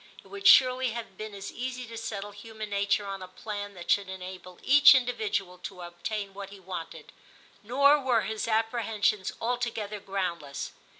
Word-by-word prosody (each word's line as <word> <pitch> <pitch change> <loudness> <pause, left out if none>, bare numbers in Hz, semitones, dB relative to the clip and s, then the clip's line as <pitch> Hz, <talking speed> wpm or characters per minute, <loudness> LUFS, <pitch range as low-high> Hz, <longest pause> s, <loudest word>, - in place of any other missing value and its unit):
* - - -18
It - - -19
would 400 0 -1
surely 255 - +6
have 230 -5 -7
been 215 +1 -7
as 200 0 -7
easy 255 +1 -5
to 230 0 -10
settle 205 -2 -5
human 215 0 -8
nature 200 0 +1
on 195 -1 -5
a 185 - -7
plan 205 +1 -6
that 175 -1 -3
should 200 -2 +2
enable 185 -1 -8
each 285 0 +8
individual 215 -7 -1
to 180 0 -8
obtain 195 +4 -5
what 200 0 -7
he 200 0 -12
wanted.' 180 -3 -7 0.5
Nor 280 +6 +4
were 250 -4 +2
his 220 0 -3
apprehensions 220 -3 +1
altogether 230 -3 -2
groundless. 175 -8 -4
205 Hz, 170 wpm, -28 LUFS, 195-235 Hz, 0.5 s, each